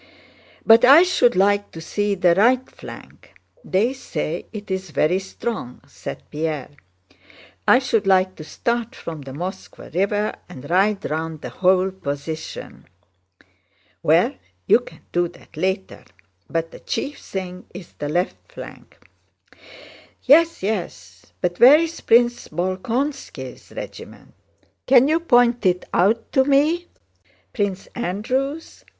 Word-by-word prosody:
"But 225 +1 +7
I 280 +7 +9
should 355 -10 +3
like 205 +2 +2
to 165 - -8
see 205 +5 -1
the 180 -2 +4
right 245 +7 +3
flank. - - -13 0.3
They 215 +7 +1
say 175 - -4
it's 190 -4 -5
very 160 +4 +1
strong," 190 - -6
said - - -8
Pierre. 150 -3 -3 1.0
"I - - +7
should 230 -6 0
like 185 -1 +3
to 155 - -8
start 235 +7 -2
from 160 -3 -7
the 135 -1 -9
Moskvá 175 +4 -7
River 205 +4 0 0.2
and 145 -5 -10
ride 195 +3 +2
round 160 0 -4
the - - -6
whole 185 0 +2
position." 155 -3 -6 1.1
"Well, - - +3 0.3
you - - +5
can 245 - -14
do 175 0 +1
that 170 -1 -18
later, 190 +4 -2 0.5
but 165 0 -2
the - - -11
chief 285 0 -4
thing 185 -1 -7
is 180 -1 -11
the 145 - -5
left 180 - -2
flank." - - -11 1.3
"Yes, 325 - +4
yes. 200 -3 -4
But 175 -1 -1
where 265 +5 +9
is 330 +1 -2
Prince 240 +1 +3
Bolkónski's 205 - -4
regiment? - - -9 0.5
Can 265 0 +6
you 315 +2 +2
point 245 -7 +3
it 180 -2 +1
out 205 +6 +2
to 265 - +4
me?" 300 +6 +2 0.7
"Prince 200 -3 -2
Andrew's? 255 - -3
195 Hz, 130 wpm, -22 LUFS, 175-245 Hz, 1.3 s, I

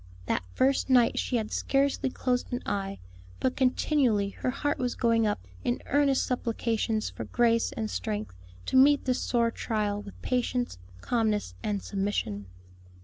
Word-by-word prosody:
That - - 0
first 270 +1 +2
night 245 -3 +4
she 255 - -1
had 220 -2 -1
scarcely 275 -1 +1
closed 250 -1 -1
an 245 +1 -3
eye, 195 -1 -2 0.4
but 260 - 0
continually 255 -5 +2
her 225 - -3
heart 290 +3 -1
was 250 -1 -1
going 230 -2 +2
up 95 - -2 0.2
in 120 - -1
earnest 280 -2 +2
supplications 225 -3 -1
for - - -6
grace 230 -1 +2
and 110 - -2
strength 105 +1 -3 0.3
to - - -2
meet 280 +2 +6
this 255 -1 +1
sore 235 -1 +1
trial 210 -3 -1
with 200 - -11
patience, 250 - -1 0.2
calmness, 215 - 0
and 205 -2 -2
submission. 195 - -2
230 Hz, 150 wpm, -28 LUFS, 205-255 Hz, 0.4 s, meet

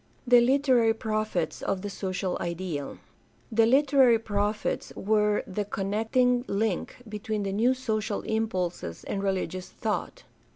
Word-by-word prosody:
The 245 -1 +7
literary 250 -3 +3
prophets 215 -6 -2
of 195 -1 -2
the 205 - -3
social 185 -1 -2
ideal. 170 -4 -4 0.3
— - - -19
^The 225 0 +5
literary 265 -3 +5
prophets 210 -1 -2
were 210 0 +1
the 200 +2 -3
connecting 225 +5 +1
link 200 -2 -1
between 210 0 -3
the 195 -1 -2
new 240 +6 +3
social 215 -5 -2
impulses 185 - -2
and 195 - -3
religious 185 -1 -2
thought. - - -3
215 Hz, 130 wpm, -27 LUFS, 195-230 Hz, 0.3 s, The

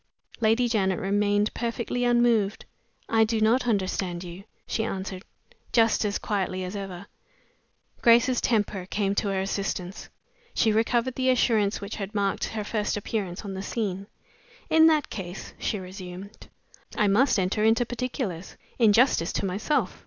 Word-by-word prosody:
Lady 230 +2 +3
Janet 190 -5 +1
remained 205 +1 +1
perfectly 235 +1 -2
unmoved. 240 -4 +2 0.4
"I 225 0 +4
do 220 0 0
not 235 +4 +3
understand 185 -4 -1
you," 180 +2 -9 0.2
she 220 - -1
answered, 190 -3 -4 0.5
just 225 -1 +4
as 205 0 0
quietly 185 -2 -2
as 185 +2 -5
ever. 195 -2 -6 1.0
Grace's 235 +1 +5
temper 205 -5 0
came 200 0 0
to 200 - 0
her 195 -1 0
assistance. 195 -1 -3 0.5
She 220 - +3
recovered 235 +3 +1
the 260 +1 0
assurance 220 -5 +2
which 200 +1 -6
had 205 0 -6
marked 200 -1 0
her 215 -1 -4
first 210 0 -1
appearance 205 -2 -4
on 195 - -5
the 190 - -5
scene. 200 -2 -3 0.6
"In 320 0 +7
that 310 -3 +2
case," 185 -2 -7
she 215 - -1
resumed, 185 +1 -9 0.5
"I 210 - +3
must 220 +5 +3
enter 190 +3 0
into 225 +2 +3
particulars, 240 - -4 0.2
in 220 -3 +5
justice 225 -8 +3
to - - -1
myself. 205 +11 -1
210 Hz, 150 wpm, -26 LUFS, 195-230 Hz, 1.0 s, In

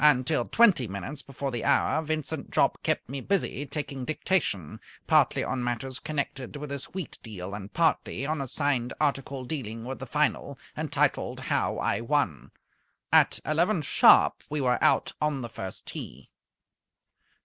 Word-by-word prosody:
Until 150 +1 +4
twenty 190 - +4
minutes 120 +9 -5
before 135 0 -5
the 120 -2 -3
hour 160 - +3
Vincent 155 -1 -3
Jopp - - +2
kept - - -1
me 135 +2 -5
busy 160 -5 -1
taking 140 -2 -4
dictation, 150 - -1 0.3
partly - - +3
on 130 -2 -2
matters 125 +2 -3
connected 140 -3 -4
with 145 0 -6
his 140 -1 -3
wheat 185 -4 -7
deal 100 -4 -7
and 100 0 -7
partly 160 -5 +1
on 155 0 -1
a 135 - -3
signed 130 -3 0
article 135 -3 -1
dealing 115 -6 -5
with 130 +1 -5
the - - -7
Final, - - 0 0.2
entitled - - 0
"How - - 0
I - - 0
Won." 115 - 0 0.6
At - - +5
eleven 165 +2 +1
sharp - - +6
we 150 - -2
were 125 -2 +1
out - - +3
on 150 -4 0
the 120 - -5
first 95 -4 -7
tee. 65 +2 -8
135 Hz, 155 wpm, -28 LUFS, 120-150 Hz, 0.6 s, sharp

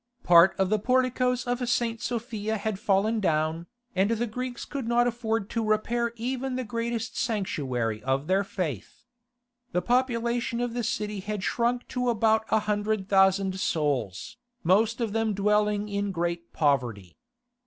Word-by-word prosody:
Part 175 +2 +6
of 190 0 +1
the 215 - +3
porticoes 250 +1 +1
of 245 0 -1
St. 230 -2 0
Sophia 220 -2 -2
had 205 -1 -3
fallen 215 0 +2
down, 160 -2 0 0.3
and 190 +2 +3
the 230 +1 0
Greeks 245 +2 -5
could 275 -5 -5
not 240 +1 +3
afford 225 -3 -1
to 230 - -1
repair 230 +2 0
even 255 +2 -3
the 255 - -2
greatest 230 0 -3
sanctuary 130 - -1
of 135 +3 0
their 190 +4 +2
faith. 175 - -5 0.7
The 180 - +2
population 240 -1 0
of 245 -1 -2
the 240 0 -2
city 210 -2 -2
had 205 0 -4
shrunk 240 +2 0
to 250 -1 -1
about 220 -1 +2
a 220 - +3
hundred 205 -1 -1
thousand 190 -1 +3
souls, 140 - -1 0.3
most 215 +7 +3
of 220 -3 -1
them 225 -2 0
dwelling 210 +1 +1
in 200 -1 -2
great 170 -1 -3
poverty. 120 - 0
215 Hz, 155 wpm, -27 LUFS, 190-235 Hz, 0.7 s, Part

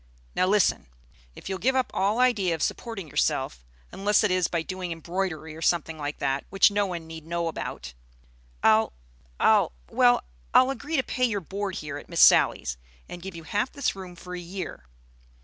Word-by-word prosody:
Now, 185 - +2
listen. 205 - +2 0.5
If - - -10
you'll 190 -1 -3
give 265 +2 +2
up 260 -1 +1
all 200 +3 +1
idea 215 -9 +3
of 160 - -3
supporting 225 -8 -3
yourself, 70 - -1 0.3
unless 205 +2 +2
it 210 - +2
is 185 -2 +2
by 170 -2 -1
doing 185 0 -5
embroidery 165 -1 -3
or 160 - -10
something 165 -1 0
like 145 0 -4
that, 135 +1 -1
which 195 +2 +5
no 205 0 +1
one 170 -3 -5
need 160 -1 -9
know 170 0 -1
about, 65 - -5 0.7
I'll 110 - +4 0.5
I'll - - +4 0.2
well - - +4 0.3
I'll 255 +1 +6
agree 290 +4 -4
to 265 - +2
pay 255 0 0
your 215 -4 0
board 195 +2 -4
here 150 -1 -5
at - - -15
Miss - - -3
Sally's, - - +5 0.3
and 175 - -8
give 190 -1 -7
you 165 - -8
half 205 - -1
this 280 -7 -1
room 185 -2 -9
for 180 +1 -9
a 180 - -4
year. 175 - -7
180 Hz, 190 wpm, -26 LUFS, 160-205 Hz, 0.7 s, I'll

